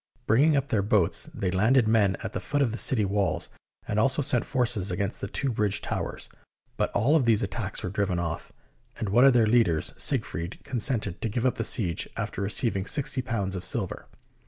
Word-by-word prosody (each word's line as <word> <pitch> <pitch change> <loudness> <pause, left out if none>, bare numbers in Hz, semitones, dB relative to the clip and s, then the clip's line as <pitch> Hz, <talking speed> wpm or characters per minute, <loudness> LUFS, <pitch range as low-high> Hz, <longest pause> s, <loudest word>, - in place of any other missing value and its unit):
Bringing 145 +7 +3
up 140 0 -2
their 105 - +1
boats, 100 -3 +1
they 95 - -3
landed 110 +6 +3
men 105 -4 +2
at - - -5
the - - -3
foot 145 +8 -1
of 120 - 0
the 115 - -4
city 110 -6 +4
walls, 100 -1 -1 0.4
and 105 - -1
also 135 +6 +2
sent 130 -3 +1
forces 120 -7 0
against 95 +3 -3
the - - -3
two 135 +6 -2
bridge 105 -3 0
towers; - - -5 0.5
but - - -1
all 135 +9 +2
of 145 -6 +2
these 115 0 +3
at - - -4
tacks 105 -3 -4
were 90 - -3
driven 100 -3 -1
off, 85 -1 -4 0.5
and 105 - -3
one 120 +6 +5
of 135 - +6
their 120 -2 +4
leaders, 105 -9 +1
Sieg - - +2
fried, 85 +3 -6
consented 115 -6 -1
to 115 - -2
give 120 +4 -2
up 130 - +3
the 115 - -3
siege, 90 -7 +1
after - - -4
receiving 100 -1 -1
sixty 140 -3 +2
pounds 105 -6 -3
of 90 - -5
silver. - - -2
110 Hz, 210 wpm, -26 LUFS, 100-125 Hz, 0.5 s, of